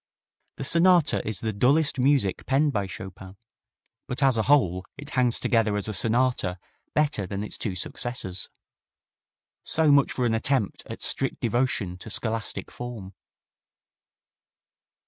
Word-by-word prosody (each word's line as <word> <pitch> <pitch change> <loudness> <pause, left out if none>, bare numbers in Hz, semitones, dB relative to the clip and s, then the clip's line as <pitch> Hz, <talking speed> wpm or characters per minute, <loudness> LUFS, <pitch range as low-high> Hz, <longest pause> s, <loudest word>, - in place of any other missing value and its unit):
The - - -6
sonata 170 +2 +4
is 110 -4 -2
the 110 -1 -2
dullest 140 +7 +2
music 130 -7 +1
penned 140 +2 +2
by 100 -3 -1
Chopin, 95 0 -9 0.7
but 130 +1 -2
as 135 -3 +5
a 110 - +2
whole 95 -11 +3
it 145 +1 -9
hangs 125 -2 +2
together 110 -3 +1
as 100 - -2
a 110 - -3
sonata 115 -3 +1 0.4
better 145 -10 +1
than 100 +2 -4
its 105 - -3
two 100 -4 -4
successors. 95 -1 -3 1.1
So 160 -2 +2
much 140 -1 +4
for 125 - -1
an 115 - +1
attempt 115 -2 0
at - - -8
strict - - +1
devotion 115 -6 -1
to 110 - -9
scholastic 110 0 -3
form. 115 -6 -8
120 Hz, 140 wpm, -26 LUFS, 100-135 Hz, 1.1 s, as